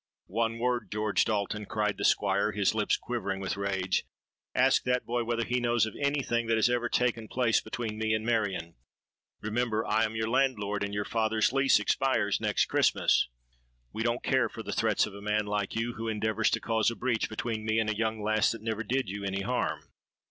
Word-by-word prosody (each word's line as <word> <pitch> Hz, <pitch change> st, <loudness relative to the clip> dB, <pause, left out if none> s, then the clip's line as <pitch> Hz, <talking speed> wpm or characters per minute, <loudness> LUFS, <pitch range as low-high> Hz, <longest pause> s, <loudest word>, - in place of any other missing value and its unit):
'—'One 115 Hz, +3 st, -1 dB
word, 120 Hz, +1 st, -1 dB
George 105 Hz, -1 st, +1 dB
Dalton!' 105 Hz, -1 st, -2 dB
cried 105 Hz, -1 st, 0 dB
the -, -, -2 dB
Squire, 100 Hz, +1 st, +2 dB
his 100 Hz, -2 st, +2 dB
lips 110 Hz, -1 st, +1 dB
quivering 100 Hz, -6 st, -3 dB
with 95 Hz, -1 st, -2 dB
rage. 95 Hz, -2 st, -1 dB, 0.5 s
'Ask -, -, +4 dB
that 125 Hz, 0 st, +1 dB
boy 120 Hz, 0 st, -1 dB
whether 115 Hz, 0 st, 0 dB
he 125 Hz, +2 st, 0 dB
knows 120 Hz, -2 st, +2 dB
of 110 Hz, -, -6 dB
any 140 Hz, 0 st, +1 dB
thing 120 Hz, -1 st, -1 dB
that 115 Hz, -, +3 dB
has 110 Hz, +2 st, +3 dB
ever 120 Hz, -1 st, 0 dB
taken 115 Hz, -3 st, 0 dB
place 120 Hz, 0 st, +2 dB
between 110 Hz, -3 st, -5 dB
me 110 Hz, 0 st, +1 dB
and 110 Hz, 0 st, -3 dB
Marion. 100 Hz, -8 st, -1 dB, 0.7 s
Remember, 110 Hz, 0 st, -1 dB
I 110 Hz, -, +2 dB
am 110 Hz, 0 st, -2 dB
your 110 Hz, 0 st, -1 dB
landlord; 110 Hz, -5 st, +1 dB
and 100 Hz, -, -3 dB
your 105 Hz, 0 st, -2 dB
father's 110 Hz, +1 st, +1 dB
lease 135 Hz, -4 st, +4 dB
expires 105 Hz, -2 st, +1 dB
next -, -, +2 dB
Christmas.'—'We -, -, -1 dB
don't 120 Hz, +1 st, 0 dB
care -, -, +2 dB
for -, -, -8 dB
the -, -, -4 dB
threats -, -, +2 dB
of 105 Hz, -, -9 dB
a 100 Hz, -, -9 dB
man 105 Hz, +1 st, 0 dB
like 105 Hz, -1 st, -2 dB
you, 115 Hz, +1 st, -1 dB
who 115 Hz, 0 st, -5 dB
endeavours 110 Hz, 0 st, +1 dB
to -, -, 0 dB
cause 110 Hz, -1 st, +1 dB
a 115 Hz, -, -5 dB
breach 120 Hz, -2 st, -1 dB
between 110 Hz, 0 st, -3 dB
me 110 Hz, 0 st, 0 dB
and 110 Hz, -1 st, +1 dB
a 110 Hz, -, 0 dB
young 110 Hz, 0 st, -1 dB
lass 110 Hz, 0 st, +2 dB
that 115 Hz, -2 st, -9 dB
never 110 Hz, 0 st, -2 dB
did 130 Hz, +2 st, -1 dB
you 100 Hz, +2 st, -5 dB
any 100 Hz, 0 st, -2 dB
harm.' 125 Hz, +4 st, -1 dB
110 Hz, 205 wpm, -29 LUFS, 105-120 Hz, 0.7 s, Ask